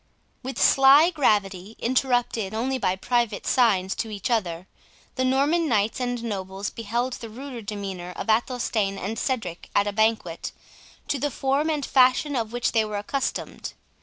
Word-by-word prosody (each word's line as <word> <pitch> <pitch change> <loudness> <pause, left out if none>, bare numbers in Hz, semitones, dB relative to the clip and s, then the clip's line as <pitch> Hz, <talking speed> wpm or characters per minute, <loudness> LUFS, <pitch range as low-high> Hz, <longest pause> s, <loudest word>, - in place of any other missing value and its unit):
With 265 +1 -5
sly 275 +5 +6
gravity, 205 - 0
interrupted 245 -4 0
only 260 +4 -1
by 185 -6 +1
private 235 +1 -1
signs 200 -7 +2
to 225 - -3
each 205 +2 -4
other, 180 -6 -1 0.5
the 260 - -1
Norman 285 +6 +2
knights 215 0 +1
and 245 -2 -2
nobles 195 -2 -4
beheld 235 +3 -2
the 230 - -7
ruder 250 +1 -8
demeanour 195 -4 -6
of - - -5
Athelstane 220 -3 0
and 210 +4 -4
Cedric 195 -10 -3
at 200 - +4
a 205 - -2
banquet, 220 -6 0 0.5
to 280 - -1
the 290 - 0
form 275 +4 0
and 300 -3 -1
fashion 260 +2 +3
of 225 -3 -2
which 240 0 0
they 225 -2 +3
were 215 -1 -5
unaccustomed. 265 +6 -3
230 Hz, 160 wpm, -25 LUFS, 205-260 Hz, 0.5 s, sly